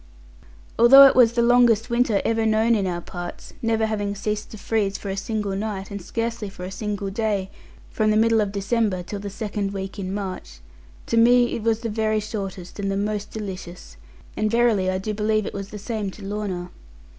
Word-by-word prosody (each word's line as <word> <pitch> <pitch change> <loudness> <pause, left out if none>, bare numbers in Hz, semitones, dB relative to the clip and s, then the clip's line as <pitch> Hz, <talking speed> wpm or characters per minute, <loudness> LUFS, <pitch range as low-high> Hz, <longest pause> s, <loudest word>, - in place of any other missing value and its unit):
Although 270 +4 +10
it 270 - +5
was 235 -2 +6
the 235 -1 +2
longest 240 -1 +4
winter 235 -4 +2
ever 225 0 +1
known 220 +1 +3
in 200 -4 +1
our 175 -1 -3
parts 175 0 -8
(never 225 -1 +1
having 205 -2 -2
ceased 210 +1 -3
to 215 - -9
freeze 200 -2 -1
for 200 - -7
a 195 - -2
single 205 0 -2
night, 200 -1 -4
and 200 -1 -5
scarcely 230 +2 -3
for 185 -2 -10
a 185 - -5
single 200 -1 -4
day, 200 -2 -1 0.4
from 215 0 +1
the 215 - +3
middle 225 0 +4
of 205 -2 -1
December 200 -2 0
till 200 +3 -6
the 200 0 -5
second 200 -1 -3
week 195 +1 -5
in 185 -1 -4
March), 185 - -6 0.5
to 230 - -1
me 240 +1 +5
it - - -3
was 225 0 0
the 235 - -3
very 215 0 0
shortest 195 -4 -6
and 195 -1 -1
the 195 - -1
most 210 0 -2
delicious; 185 - -8 0.4
and 215 - 0
verily 230 -5 +2
I 185 - 0
do 215 +3 -3
believe 215 0 0
it - - -5
was 200 0 -6
the 210 - -7
same 210 -1 -3
to 195 +1 -10
Lorna. 195 -3 -4
210 Hz, 205 wpm, -23 LUFS, 195-225 Hz, 0.5 s, Although